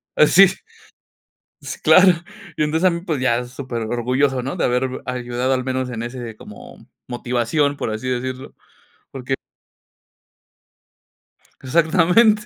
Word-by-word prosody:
ah 150 - +5
sí, 195 +5 +7 1.2
Sí - - -6
claro, 185 +1 +6 0.5
y - - +1
entonces, 160 +4 +2
a - - +5
mí, 170 -1 -3
pues, 160 -7 -3
ya 125 -1 +1
superorgulloso, 125 +1 -2
¿no?, 135 +2 -4
de - - -2
haber 125 +1 0 0.2
ayudado 125 +1 -2
al 130 -1 -1
menos 130 0 -2
en 115 -2 -5
ese 120 -1 -6
como 105 -1 -13 0.2
motivación, 125 +4 -1
por 110 - -3
así 110 +4 -5
decirlo, 130 +1 -4 0.6
porque 135 0 -4 2.3
Exactamente. 180 - +3
130 Hz, 125 wpm, -20 LUFS, 120-150 Hz, 2.3 s, sí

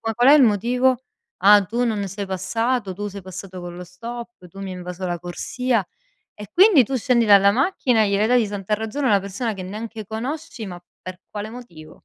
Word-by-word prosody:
qual 245 +3 +5
è - - +9
il 300 - +7
motivo? 245 +4 +2 0.5
"Ah 205 0 +7
tu 235 +5 -1
non 205 -3 -1
sei 200 +2 -5
passato, 190 +3 -1
tu 205 +2 -5
sei 200 0 -8
passato 185 0 -9
con 175 0 -8
lo 180 - -7
stop, 230 +2 -9
tu 195 +3 -13
mi 195 -1 -5
hai 180 - -7
invaso 180 +1 -6
la 175 -1 -3
corsia". 225 +5 -2 0.5
E 210 -1 -9
quindi 370 - +6
tu 265 +4 -3
scendi 235 -1 +2
dalla 200 -1 +6
macchina 255 - +1
e 200 - +1
gliele 205 +2 +2
dai 250 0 +4
di 215 - -1
santa 205 0 -4
ragione 220 +6 -2
a - - +2
una 200 -1 +4
persona 200 +4 -4
che 190 -2 -7
neanche 215 +2 -7
conosci, 245 - -5
ma 175 -2 -8 0.2
per 185 -1 -8
quale 210 +1 -6
motivo? 170 -11 -11
210 Hz, 215 wpm, -22 LUFS, 190-240 Hz, 0.5 s, è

